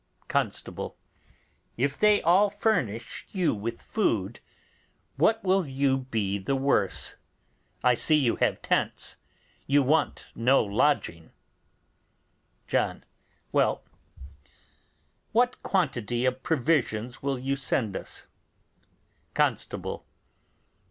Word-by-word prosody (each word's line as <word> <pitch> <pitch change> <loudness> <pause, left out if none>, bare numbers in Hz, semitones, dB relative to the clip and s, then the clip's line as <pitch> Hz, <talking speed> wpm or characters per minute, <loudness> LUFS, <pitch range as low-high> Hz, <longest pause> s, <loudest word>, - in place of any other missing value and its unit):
Constable. - - -2 0.8
If 140 +4 0
they 210 +3 +4
all 185 +5 +5
furnish 195 - -1
you 185 -4 +1
with 115 +2 -4
food, 115 - -1 0.8
what 225 0 +2
will 190 -3 +2
you 135 0 +1
be 100 -3 -1
the 135 +8 -1
worse? 135 -8 +1 0.7
I 125 - +5
see 155 +6 +2
you 135 -6 +2
have - - 0
tents; - - -1 0.5
you 140 +1 +4
want 150 +3 +1
no 125 +4 +3
lodging. 100 - 0 1.3
John. - - -1 0.5
Well, - - +2 1.5
what 245 +2 +2
quantity 125 - 0
of 130 0 0
provisions 125 -6 0
will 140 -1 -1
you 135 +2 -1
send 120 -6 -1
us? - - -7 1.1
Constable. - - -1
135 Hz, 100 wpm, -27 LUFS, 115-160 Hz, 1.5 s, all